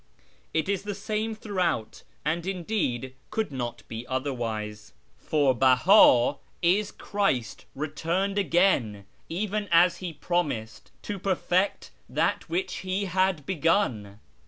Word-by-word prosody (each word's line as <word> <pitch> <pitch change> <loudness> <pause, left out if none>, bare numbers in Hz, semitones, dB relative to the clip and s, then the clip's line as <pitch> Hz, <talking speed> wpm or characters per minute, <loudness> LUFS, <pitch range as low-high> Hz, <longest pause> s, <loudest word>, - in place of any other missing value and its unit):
It 160 - 0
is 195 -2 0
the 205 0 -5
same 215 +2 -2
throughout, 180 - -2 0.2
and, 165 +3 -1
indeed, 170 - -2 0.2
could 220 -7 -2
not 120 -3 -4
be 115 +2 -7
otherwise, 115 -6 -3 0.3
for 145 -4 +2
Beha 130 - +6 0.3
is 195 +4 +3
Christ 195 - -1
returned 165 +7 -1
again, 165 - +2 0.2
even 205 +3 -2
as 170 +1 +5
He 180 -2 -5
promised, 145 -10 -2
to 205 -2 -4
perfect 185 0 0 0.2
that - - 0
which 370 +3 -2
He 190 +2 -2
had 185 -4 +1
begun. 145 - 0
170 Hz, 115 wpm, -27 LUFS, 130-195 Hz, 0.3 s, Beha